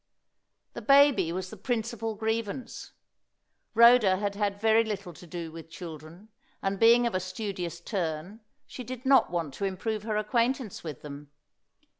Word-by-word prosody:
The -, -, -7 dB
baby 275 Hz, -, +5 dB
was 185 Hz, +1 st, -4 dB
the 220 Hz, -, -9 dB
principal 225 Hz, 0 st, -3 dB
grievance. 220 Hz, +2 st, -4 dB, 0.8 s
Rhoda 235 Hz, -4 st, +6 dB
had 200 Hz, 0 st, -2 dB
had 200 Hz, -1 st, -2 dB
very 220 Hz, +1 st, +4 dB
little 200 Hz, -5 st, -5 dB
to 175 Hz, -, -14 dB
do 165 Hz, -1 st, -6 dB
with 165 Hz, 0 st, -10 dB
children; 165 Hz, +4 st, -10 dB, 0.3 s
and 195 Hz, 0 st, -2 dB
being 235 Hz, +2 st, +6 dB
of 235 Hz, -, -1 dB
a 185 Hz, -, +1 dB
studious 185 Hz, -3 st, -5 dB
turn, 175 Hz, +1 st, -4 dB, 0.3 s
she 250 Hz, -, -8 dB
did 255 Hz, +2 st, -8 dB
not 270 Hz, 0 st, +5 dB
want 165 Hz, -5 st, -3 dB
to 200 Hz, -, -3 dB
improve 205 Hz, +3 st, -2 dB
her 215 Hz, 0 st, -2 dB
acquaintance 235 Hz, +1 st, -1 dB
with 155 Hz, -5 st, -7 dB
them. 145 Hz, 0 st, -9 dB
205 Hz, 155 wpm, -28 LUFS, 175-230 Hz, 0.8 s, Rhoda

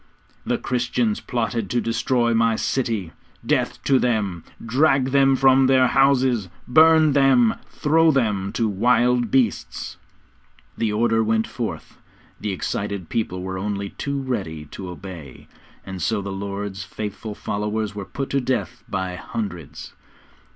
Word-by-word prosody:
'The -, -, +1 dB
Christians 120 Hz, -3 st, -1 dB
plotted 115 Hz, -3 st, -2 dB
to 120 Hz, -, +1 dB
destroy 120 Hz, +1 st, +1 dB
my 115 Hz, 0 st, +3 dB
city 110 Hz, -9 st, -1 dB, 0.3 s
death -, -, 0 dB
to 135 Hz, -2 st, +3 dB
them! 105 Hz, -9 st, -1 dB, 0.2 s
Drag 135 Hz, +2 st, +2 dB
them 135 Hz, -1 st, +4 dB
from 135 Hz, 0 st, +5 dB
their 130 Hz, -1 st, +4 dB
houses, 130 Hz, -7 st, +3 dB, 0.2 s
burn 160 Hz, +3 st, +6 dB
them, 135 Hz, -5 st, +4 dB, 0.2 s
throw 160 Hz, +2 st, +3 dB
them 105 Hz, -9 st, +1 dB
to 115 Hz, -, +1 dB
wild 120 Hz, +3 st, +2 dB
beasts!' 125 Hz, -4 st, -1 dB, 0.8 s
The 115 Hz, -2 st, -1 dB
order 115 Hz, +1 st, +2 dB
went 110 Hz, 0 st, +1 dB
forth, -, -, -6 dB, 0.4 s
the 105 Hz, -, -3 dB
excited 100 Hz, -1 st, -3 dB
people 95 Hz, -5 st, -2 dB
were 95 Hz, 0 st, -4 dB
only 100 Hz, 0 st, -3 dB
too 140 Hz, 0 st, -3 dB
ready 95 Hz, -, -4 dB
to 95 Hz, -2 st, -7 dB
obey, 90 Hz, -6 st, -10 dB, 0.4 s
and 95 Hz, -1 st, -6 dB
so 110 Hz, -2 st, 0 dB
the 100 Hz, 0 st, -5 dB
Lord's 100 Hz, 0 st, -5 dB
faithful 105 Hz, +1 st, -6 dB
followers 105 Hz, +1 st, -3 dB
were 105 Hz, -1 st, -5 dB
put 135 Hz, +6 st, -5 dB
to 140 Hz, -, +1 dB
death 130 Hz, +1 st, -2 dB
by 95 Hz, -1 st, -3 dB
hundreds. 90 Hz, -4 st, -6 dB
115 Hz, 135 wpm, -22 LUFS, 100-130 Hz, 0.8 s, burn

